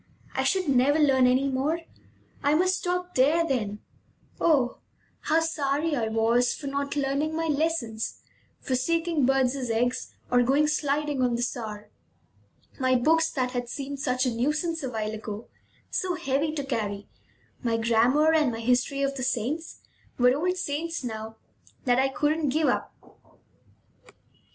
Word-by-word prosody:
I - - 0
should 375 -3 +1
never 275 +2 +3
learn 270 -4 +4
any 260 +2 +3
more! 275 +5 0 0.6
I 285 +1 +3
must 370 +3 +2
stop 360 0 -2
there, 305 +6 +3
then! 215 -8 -2 0.6
Oh, 275 -7 +2 0.4
how 320 +1 +2
sorry 310 -1 0
I 230 -4 0
was 230 +2 +2
for 290 - -9
not 280 +1 -2
learning 285 +2 0
my 325 0 -1
lessons, 295 -8 -1 0.4
for 260 - -3
seeking 330 +1 +1
birds' 265 -1 +1
eggs, 245 +2 -1 0.2
or 245 0 +5
going 275 +5 +3
sliding 295 -2 0
on 245 -2 +2
the 240 - -1
Saar! 215 -4 -5 0.9
My 255 -1 +3
books, 320 +6 +3
that 255 -3 -1
had 245 -1 -3
seemed 280 +1 -5
such 255 0 0
a 250 - 0
nuisance 305 +7 -1
a 265 - -3
while 215 -3 -3
ago, 215 0 -7 0.4
so 365 -1 -1
heavy 305 -2 0
to 290 -2 -3
carry, 205 -6 -3 0.5
my 230 -3 0
grammar, 240 +7 +3
and 305 -5 +3
my 225 - -5
history 250 +4 +1
of 275 0 0
the - - -4
saints, 265 +6 -2 0.4
were 250 +1 +4
old 360 +5 0
friends 330 0 -3
now 220 -2 -5 0.5
that 245 -1 +3
I 265 - +3
couldn't 300 +2 0
give 310 +3 +2
up. - - -1
275 Hz, 155 wpm, -26 LUFS, 245-310 Hz, 0.9 s, or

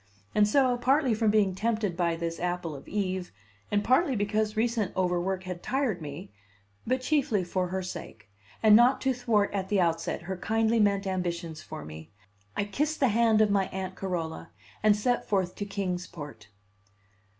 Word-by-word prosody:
And 210 -1 +4
so, 255 +2 +3
partly 260 +1 +2
from 220 0 +2
being 205 -3 +3
tempted 215 -2 -1
by 170 -1 +1
this 165 0 -4
apple 175 -3 -2
of 135 - -11
Eve, 185 -3 -2 0.4
and 205 0 +1
partly 260 +4 +3
because 215 +1 0
recent 225 -4 0
overwork 185 +1 0
had 180 -1 -6
tired 250 -9 -1
me, 150 +4 -8 0.6
but 255 +2 +1
chiefly 255 -8 +1
for 180 +1 -1
her 190 +1 -3
sake, 110 - -8 0.4
and 215 -1 +8
not 245 +4 +5
to 265 0 +2
thwart 230 -5 +1
at 190 -1 -2
the 205 - +2
outset 165 -1 0
her 190 +2 -4
kindly 225 +4 +1
meant 200 -1 +2
ambitions 170 -4 -3
for 75 - -8
me, 80 +1 -10 0.5
I - - +2
kissed 295 +10 -1
the 265 - +4
hand 225 0 +4
of 210 -1 +3
my 195 -2 +2
Aunt 190 -1 -5
Carola 165 - -4 0.3
and 215 -1 +5
set 245 +4 0
forth 190 -3 +1
to 205 - -3
Kings 185 -3 -3
Port. 145 -10 -10
200 Hz, 175 wpm, -28 LUFS, 180-225 Hz, 0.6 s, and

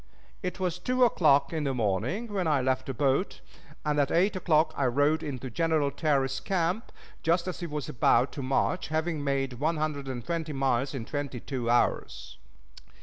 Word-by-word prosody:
It 180 -1 -4
was 180 -2 -1
two 255 +6 +1
o'clock 145 - +4
in 160 -2 -1
the 135 -2 -1
morning 125 - -1
when 185 -4 0
I 150 -3 +3
left 130 0 0
the 135 - -2
boat, 140 - +1 0.5
and 150 -1 +1
at 140 - +2
eight 190 +5 +2
o'clock 160 -3 +2
I 140 - 0
rode 145 +5 +2
into 130 -4 -5
General 160 0 +1
Terry's 135 -4 0
camp, 185 +3 -1 0.3
just 170 +2 +1
as 185 - -4
he 175 - -4
was 150 -3 -4
about 120 +1 +3
to 140 - -6
march, 135 +7 0
having 160 -1 -1
made 135 -3 -1
one 160 +3 +1
hundred 150 -3 -2
and 125 -3 -5
twenty 165 -3 -3
miles 135 0 0
in 120 -4 -4
twenty 140 -1 -4
two 125 -2 -4
hours. - - 0
145 Hz, 185 wpm, -28 LUFS, 135-165 Hz, 0.5 s, o'clock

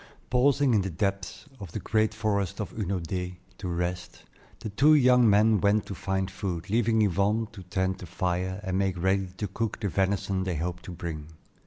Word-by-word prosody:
Pausing 135 +1 +3
in 105 - +4
the 95 - -3
depths 100 +2 -3
of 95 -5 -9
the - - -3
great 110 +1 +1
forest 100 -4 -1
of 100 -4 -4
Hunaudaye 90 -2 -3 0.2
to 95 - -4
rest, 90 0 -3 0.4
the 110 - -4
two 145 +9 +5
young 125 -4 +5
men 105 0 +4
went 105 0 +3
to - - -6
find 95 0 -2
food, 95 -3 -4
leaving 110 -1 +3
Yvonne 105 +4 +1
to 105 - -10
tend 95 +1 -2
the 90 - -8
fire 90 +2 -2
and 95 -1 -1
make 95 -2 0
ready 95 +1 +1
to 105 - -2
cook 110 +3 -3
the 100 - -1
venison 95 0 0
they 95 -2 -2
hoped 90 +3 -4
to - - -7
bring. 80 -3 -6
95 Hz, 190 wpm, -27 LUFS, 90-110 Hz, 0.4 s, two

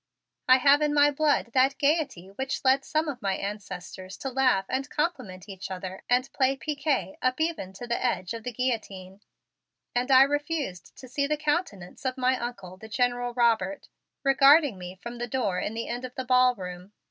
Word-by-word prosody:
I 255 0 +8
have 280 +2 +5
in 295 0 +1
my 290 0 +5
blood 290 -5 +1
that 270 +2 +3
gayety 280 - 0
which 265 +7 -4
led 265 +1 +4
some 310 +2 -1
of 265 -4 -5
my 195 -2 0
ancestors 190 -2 -7
to 270 - -5
laugh 255 -7 +2
and 270 +2 -2
compliment 255 - -3
each 190 -1 -7
other 185 0 -6
and 250 +2 +1
play 270 0 +2
piquet 295 +1 -2
up 255 +2 0
even 315 - -2
to 195 +5 -8
the 235 +1 -2
edge 210 -7 -1
of 230 - -6
the 245 - -4
guillotine, 210 -6 -4 0.7
and 245 +2 0
I 265 0 +8
refused 290 - -3
to 260 - -11
see 280 +3 -1
the 300 +1 0
countenance 295 - -2
of 260 -1 -2
my 255 0 +2
Uncle, 195 -7 -6
the 220 +3 -12
General 245 +1 0
Robert, 240 +4 +1 0.3
regarding 275 - +5
me 180 0 -8
from 235 0 -7
the 240 - -3
door 215 -7 -1
in 210 - -3
the 230 - -4
end 245 +1 -4
of 255 -1 -7
the 260 - -4
ballroom. 210 -7 +1
250 Hz, 190 wpm, -27 LUFS, 200-280 Hz, 0.7 s, I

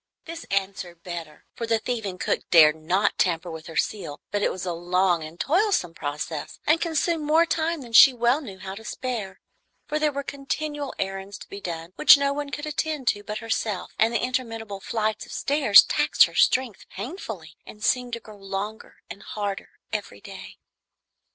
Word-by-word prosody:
This 330 +1 -7
answered 190 -3 -3
better, 170 -4 -8
for 230 - -5
the 225 0 +3
thieving 220 -5 -3
cook - - 0
dared 155 -3 +7
not 175 +6 0
tamper 175 -1 +1
with 160 0 -8
her 165 - -7
seal; 190 -9 -2
but 205 0 0
it - - +2
was 185 0 -5
a 175 - -2
long 175 0 +1
and 155 +2 -10
toilsome 355 - +1
process, 150 0 -5
and 315 +2 +3
consumed 330 -1 0
more 315 +3 +4
time 325 -1 -1
than 235 -3 -11
she 265 - +10
well 245 +4 +2
knew 200 -9 -9
how 190 0 -7
to 215 +3 -10
spare, 220 -6 -4 0.5
for 305 - -2
there 305 -1 +2
were 280 0 -4
continual 285 +1 -4
errands 195 +1 -4
to - - -12
be 200 - -9
done 170 -1 -6
which 300 - +9
no 280 0 +1
one 290 0 -4
could 290 +1 -5
attend 305 -3 -3
to 205 - -1
but 210 +1 -5
herself, 220 -4 -2
and 225 +1 +4
the 235 - 0
interminable 225 -5 -3
flights 215 +1 -2
of - - -12
stairs 275 -8 +6
taxed - - +4
her - - 0
strength 255 -5 +2
painfully, 200 - -7
and 210 - -11
seemed 250 0 +1
to 235 - -2
grow 215 -2 -14
longer 200 +2 -6
and 200 - -9
harder 205 -2 -4 0.2
every - - -4
day. - - -11
215 Hz, 190 wpm, -25 LUFS, 185-275 Hz, 0.5 s, she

